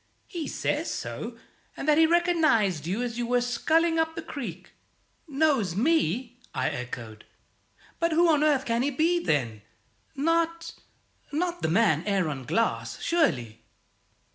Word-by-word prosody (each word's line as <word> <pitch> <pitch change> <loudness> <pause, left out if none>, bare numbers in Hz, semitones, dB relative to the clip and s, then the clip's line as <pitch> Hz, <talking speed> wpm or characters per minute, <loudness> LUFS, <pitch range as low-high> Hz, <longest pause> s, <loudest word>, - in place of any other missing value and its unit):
"He 340 -4 -5
says - - -2
so, - - -5 0.4
and - - -5
that 300 0 +5
he 325 - +6
recognized 315 - +2
you 200 +7 -1
as 240 -1 -4
you 240 - -1
were 245 0 +2
sculling 320 +7 +1
up 320 0 0
the 330 - -5
creek." 190 - -7 0.6
"Knows 275 - +1
me?" 250 - +1 0.2
I 130 - +1
echoed. 120 -3 -7 0.8
"But 335 0 +1
who 340 +2 +4
on 305 -2 +3
earth 290 -3 +2
can 230 0 0
he 275 - +1
be, 325 +6 +1
then? 120 -8 0 0.5
Not 330 +3 0 0.6
not 345 +3 -2
the - - 0
man 175 -4 +3
Aaron 160 -10 -1
Glass, 230 - -1
surely?" 125 - 0
260 Hz, 140 wpm, -27 LUFS, -, 0.8 s, he